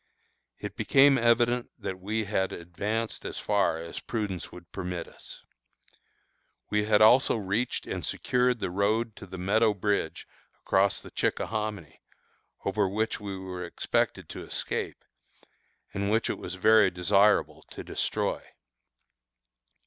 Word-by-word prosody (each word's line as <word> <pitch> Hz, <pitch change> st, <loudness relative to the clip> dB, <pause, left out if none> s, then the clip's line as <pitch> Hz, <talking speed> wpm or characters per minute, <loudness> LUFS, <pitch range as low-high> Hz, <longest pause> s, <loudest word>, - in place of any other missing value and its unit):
It -, -, -7 dB
became 140 Hz, 0 st, +5 dB
evident 120 Hz, +1 st, +3 dB
that 95 Hz, -1 st, -5 dB
we 110 Hz, +4 st, -1 dB
had 100 Hz, -2 st, 0 dB
advanced 105 Hz, +7 st, -3 dB
as -, -, -5 dB
far 100 Hz, -5 st, +1 dB
as 85 Hz, +1 st, -6 dB
prudence 105 Hz, -7 st, -4 dB
would 90 Hz, -1 st, -13 dB
permit 90 Hz, -2 st, -4 dB
us. -, -, -12 dB, 1.3 s
We 105 Hz, 0 st, +2 dB
had 105 Hz, 0 st, +5 dB
also 120 Hz, +5 st, +6 dB
reached 110 Hz, +3 st, -1 dB
and -, -, -4 dB
secured 125 Hz, 0 st, +1 dB
the 90 Hz, -, -3 dB
road 110 Hz, +4 st, 0 dB
to 95 Hz, -, -10 dB
the 95 Hz, +1 st, -8 dB
Meadow 105 Hz, +4 st, +2 dB
Bridge 100 Hz, -4 st, -1 dB, 0.3 s
across 95 Hz, +1 st, +2 dB
the -, -, -12 dB
Chickahominy, 105 Hz, -7 st, -2 dB, 0.6 s
over 100 Hz, 0 st, +1 dB
which 110 Hz, +3 st, -1 dB
we 100 Hz, -2 st, -5 dB
were 95 Hz, -1 st, -6 dB
expected 85 Hz, -, -1 dB
to -, -, -7 dB
escape, -, -, -4 dB, 0.9 s
and 100 Hz, 0 st, -1 dB
which 110 Hz, +2 st, +1 dB
it -, -, -5 dB
was 90 Hz, -, -6 dB
very 110 Hz, +3 st, +5 dB
desirable 100 Hz, +4 st, +3 dB
to -, -, -8 dB
destroy. -, -, -1 dB
105 Hz, 135 wpm, -28 LUFS, 95-110 Hz, 1.3 s, also